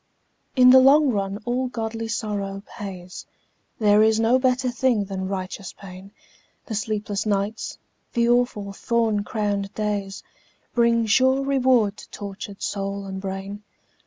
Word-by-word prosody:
In 250 -1 +7
the 260 - +9
long 275 +2 +6
run 200 -1 -2
all 250 +1 0
godly 225 -2 -4
sorrow 200 -3 -3
pays, 185 -3 -8 0.5
There 210 -1 +4
is 220 0 +4
no 230 +3 +3
better 255 0 +1
thing 245 -4 +1
than 190 -1 -4
righteous 190 0 -5
pain, 190 0 -12 0.5
The 225 - -6
sleepless 210 -1 -2
nights, 205 +1 -2 0.4
the 235 -1 +2
awful 240 -5 +1
thorn 225 -1 0
crowned 205 -2 -2
days, 205 -2 -3 0.5
Bring 235 -1 +3
sure 260 +5 +3
reward 255 -6 +2
to - - -13
tortured 200 0 -8
soul 200 0 -3
and 190 0 -6
brain. 195 +1 -5
210 Hz, 135 wpm, -23 LUFS, 200-240 Hz, 0.5 s, the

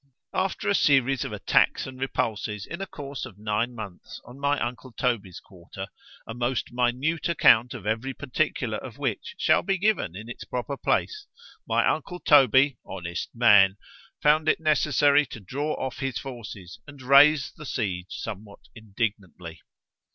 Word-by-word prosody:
After 190 0 -1
a 200 - +3
series 135 -6 +3
of - - -5
attacks - - +2
and 130 -1 -9
repulses 105 -5 -2
in 170 +3 -7
a 195 - -4
course 140 -1 -7
of 120 -7 -9
nine 110 +3 -2
months 100 -6 -9
on 125 +3 -13
my 145 +1 +1
uncle 120 +1 -5
Toby's 115 -8 -2
quarter, 95 +1 -10 0.4
a 115 - -7
most 120 +2 -2
minute 125 +8 0
account 125 -6 +4
of 105 -5 -9
every 115 +5 -2
particular 140 -3 -2
of - - -10
which - - -3
shall - - +3
be 195 +1 0
given 190 - 0
in 105 +4 -8
its 120 - -8
proper 125 +3 -4
place, 420 - -1 0.4
my - - +2
uncle 180 -1 -2
Toby, 135 -3 +5
honest 85 -2 -6
man! 105 -4 +6 0.5
found 155 +1 +4
it - - +2
necessary 150 -2 +3
to 115 - -9
draw 140 +10 -3
off 130 -2 -5
his 135 -3 -2
forces 105 -9 -8
and 140 -2 -12
raise 140 +2 +6
the 155 - -12
siege 95 -8 -3
somewhat 105 0 -8
indignantly. 100 -7 -5
125 Hz, 160 wpm, -26 LUFS, 105-140 Hz, 0.5 s, man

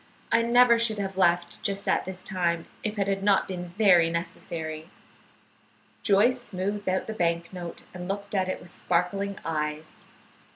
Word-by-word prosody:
I 230 - +5
never 235 0 +5
should 225 -2 +1
have 195 -1 -3
left 175 -2 +2
just 200 0 -2
at - - +2
this 185 0 -7
time 170 -4 -1 0.2
if 215 0 -3
it 200 -1 +1
had 195 0 0
not 200 -1 +3
been 180 -2 -5
very 180 -6 +6
necessary." 160 -1 -5 1.1
Joyce 230 +5 +3
smoothed 205 -1 -3
out 185 0 0
the 220 - -4
bank 170 -2 -1
note 175 -2 -7
and 180 -1 -6
looked 200 +1 -4
at 190 -2 +1
it - - -2
with 175 - -13
sparkling 195 +4 -1
eyes. 150 -1 -3
190 Hz, 165 wpm, -27 LUFS, 170-205 Hz, 1.1 s, very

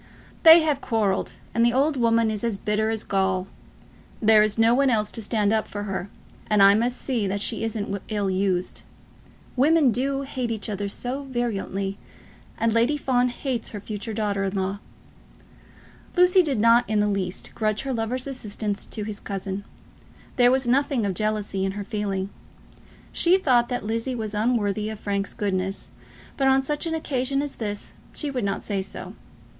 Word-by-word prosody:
"They 330 +1 +9
have 295 -3 0
quarrelled, 210 -5 0 0.2
and 230 - +2
the 235 0 +4
old 285 +4 +2
woman 230 -2 +2
is 210 0 -4
as 230 -4 0
bitter 210 +2 0
as 220 -1 -1
gall. 190 -1 0 0.7
There 220 -1 +6
is 215 0 +1
no 225 +1 +5
one 275 +2 +3
else 215 -3 +1
to 225 - -4
stand 210 -1 +1
up 220 -1 0
for 205 0 -5
her, 195 -1 -4 0.4
and 210 -2 +5
I 195 0 +8
must 240 +4 +1
see 235 -7 -1
that 200 +1 -1
she 220 +2 0
isn't 205 -3 -3
ill 205 -3 -1
used. 185 -1 -1 0.7
Women 290 +1 +4
do 270 +4 -1
hate 260 -3 -3
each 220 -1 -3
other 205 -1 -3
so 255 +7 -4
virulently, 200 -6 -3 0.6
and 230 -1 +1
Lady 235 +6 +2
Fawn 250 -3 +1
hates 245 -1 -3
her 210 - -6
future 210 +2 -6
daughter 205 -2 -1
in 195 +1 -3
law." 195 +1 -2 1.4
Lucy 360 +1 +6
did 285 -9 -1
not 230 +2 +5
in 215 -1 +2
the 210 - +2
least 190 -3 -3
grudge 215 -1 0
her 270 -1 -3
lover's 245 +2 -2
assistance 215 -6 -3
to 215 - -5
his 205 -1 -6
cousin. 195 0 -5 0.7
There 245 -2 +5
was 260 0 +1
nothing 265 -2 +2
of 195 - -1
jealousy 210 -1 -1
in 195 0 -1
her 205 0 -5
feeling. 200 -2 -3 0.8
She 350 +2 +4
thought 245 -9 +2
that 245 -4 -3
Lizzie 230 +4 -2
was 220 -3 -4
unworthy 215 -2 0
of 220 -1 -7
Frank's 200 -1 -2
goodness, 195 -2 -2 0.5
but 270 - +2
on 265 0 +4
such 295 +4 -1
an 325 - -1
occasion 275 -2 -1
as 290 - -6
this 205 -2 -5 0.2
she 295 -2 -2
would 250 -4 -2
not 195 -1 -2
say 200 -2 -2
so. 190 - -8
220 Hz, 180 wpm, -24 LUFS, 200-255 Hz, 1.4 s, They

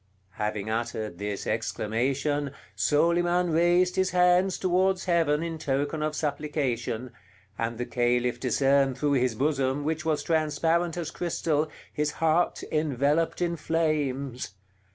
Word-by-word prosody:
Having 105 -1 -2
uttered 110 -5 -3
this 100 -1 -4
exclamation, 140 +6 -1 0.2
Soliman 175 +3 +2
raised 175 +3 +3
his 190 0 +2
hands 180 +1 +3
towards 185 +1 +1
Heaven 165 -4 +2
in 165 -1 -4
token 145 +2 -1
of 155 0 -1
supplication, 135 -6 -2 0.4
and 115 +2 -3
the 125 - -2
Caliph 120 0 0
discerned 135 0 +2
through 145 +1 +1
his 125 -3 +1
bosom, 140 +1 0
which 160 +2 -2
was 160 -2 0
transparent 165 +2 +1
as 165 -3 -3
crystal, 160 -3 -1 0.2
his 150 0 -1
heart 165 +2 +1
enveloped 150 +3 +1
in 170 -1 0
flames. 140 - -1
150 Hz, 125 wpm, -27 LUFS, 130-165 Hz, 0.4 s, raised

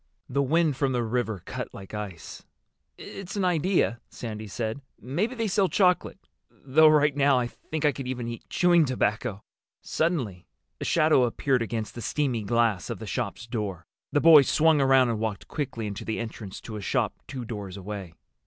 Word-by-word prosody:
The 140 +2 0
wind 155 +1 +2
from 135 -2 +1
the 120 -1 0
river 110 -4 -2
cut - - -6
like 95 +1 -10
ice. 100 -6 -7 0.5
"It's 195 0 -8
an 200 -2 0
idea," 175 - +1
Sandy 110 -2 -6
said. 110 +5 -4 0.2
"Maybe 190 - -2
they 230 -2 -1
sell 195 -1 +2
chocolate. 180 -3 +2 0.3
Though 155 +4 +4
right 150 -2 +4
now 140 -2 +4
I 125 - +1
think 155 +5 -5
I 150 - +5
could 135 -2 -6
even 125 -2 -3
eat 115 -1 -7
chewing 175 -2 +4
tobacco." 105 -4 -1 0.4
Suddenly 130 - -1 0.3
a - - -4
shadow 155 -6 +4
appeared 125 +2 0
against 115 -1 -3
the 120 - -7
steamy 130 -1 -1
glass 110 -4 +1
of - - -3
the - - -8
shop's 110 - -3
door. 105 -8 -4 0.3
The 145 - +3
boys 155 -5 +8
swung 155 -2 +4
around 135 -2 +5
and 115 -2 -1
walked 110 -3 -3
quickly 125 -7 -4
into 100 -1 -5
the 110 - -3
entrance 110 -4 -6
to 110 - -7
a - - -6
shop - - 0
two 130 -3 -6
doors 100 -4 -6
away. 100 -3 -7
125 Hz, 180 wpm, -26 LUFS, 110-150 Hz, 0.5 s, boys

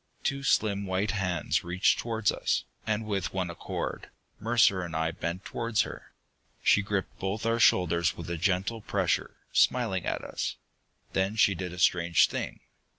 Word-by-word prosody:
Two 140 0 -1
slim 100 -6 +1
white 95 +2 0
hands 90 -5 0
reached 90 +1 +2
towards 115 -3 0
us, - - 0 0.2
and 110 0 0
with 95 -5 -2
one 90 -2 -1
accord, 85 - -5 0.3
Mercer 110 -4 +3
and 85 -2 -5
I 80 +1 0
bent 85 +2 -4
towards 115 -3 0
her. - - -9 0.5
She 100 - +5
gripped 100 -1 -3
both 100 +4 -3
our 115 +1 +1
shoulders 85 -4 +3
with 85 - -7
a 85 - -2
gentle 95 +6 0
pressure, - - -1 0.2
smiling - - +2
at - - -2
us. - - -3 0.6
Then 95 +3 0
she 105 -2 +4
did 90 -1 -5
a 90 - -9
strange 85 -1 +4
thing. - - -4
95 Hz, 160 wpm, -28 LUFS, 90-105 Hz, 0.6 s, She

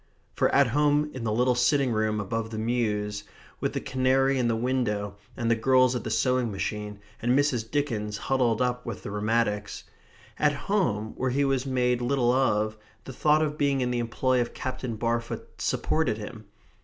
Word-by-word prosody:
For - - +2
at 140 - +5
home 145 +3 +2
in 130 -3 -5
the 110 - 0
little 125 +3 +3
sitting 130 +2 +2
room 110 -1 0
above 110 +3 -3
the 110 - -6
mews, 105 -3 -1 0.4
with - - -1
the - - -1
canary 130 +1 +2
in 120 - +2
the 115 - +1
window, 110 -4 -1 0.2
and 115 -2 0
the - - +4
girls 130 +2 +3
at 125 - -3
the - - -4
sewing 125 +1 +1
machine, 105 +1 -4 0.2
and 120 +3 +2
Mrs. 125 -6 +1
Dickens 115 -7 -1
huddled 125 -2 +1
up 125 0 -1
with 115 -4 -6
the - - -5
rheumatics 105 -1 -1 0.6
at 150 -1 +3
home 135 - -1
where 130 - 0
he 140 +3 +1
was 135 -1 0
made 125 -2 +1
little 120 -1 +2
of, 110 -4 +1 0.3
the 130 - -8
thought 150 +4 +3
of 150 0 -3
being 140 -2 +2
in 125 0 0
the 120 - 0
employ 125 +2 +1
of 120 - -4
Captain 130 -2 -4
Barfoot 115 +1 -3
supported 155 -9 0
him. 110 0 -8
120 Hz, 185 wpm, -27 LUFS, 110-130 Hz, 0.6 s, at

